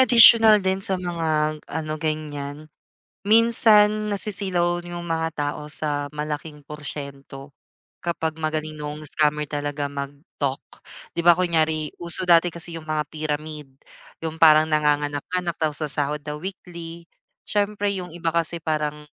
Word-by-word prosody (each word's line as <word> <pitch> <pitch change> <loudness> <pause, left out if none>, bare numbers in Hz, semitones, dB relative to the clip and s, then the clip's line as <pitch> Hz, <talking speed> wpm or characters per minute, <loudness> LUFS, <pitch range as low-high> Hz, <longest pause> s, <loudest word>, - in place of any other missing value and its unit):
additional 230 -3 +8
din 190 0 0
sa 195 0 0
mga 160 -4 -1
ano 155 -1 -4
ganiyan, 150 -1 -4 0.6
minsan 215 -2 +5
nasisilaw 185 -4 +1
yung 175 0 -7
mga 165 -1 -1 0.2
tao 150 0 -9
sa 145 -1 -2
malaking 150 -1 -5
porsiyento, 140 -2 -8 0.5
kapag 160 -2 -3
magaling 155 0 -2
nung 150 0 -7
scammer 150 0 +1
talaga 145 0 -3
mag-talk, 140 0 -5 0.5
'di 170 - -2
ba 175 +1 +6
kunyari 160 -4 0
uso 175 +2 -2
dati 175 0 +5
kasi 170 0 -3
yung 160 -1 -9
mga 155 -1 -1
pyramid, 150 -1 -5 0.6
yung 160 0 -6
parang 155 -1 +7
nanganganak-nganak 150 +3 0
tapos 155 0 0
sasahod 150 0 +1
daw 150 0 -6
weekly. 170 -3 -8 0.4
Siyempre 205 -1 0
yung 180 -2 -5
iba 165 -1 -2
kasi 170 0 0
parang 150 -1 -2
155 Hz, 130 wpm, -23 LUFS, 150-175 Hz, 0.6 s, additional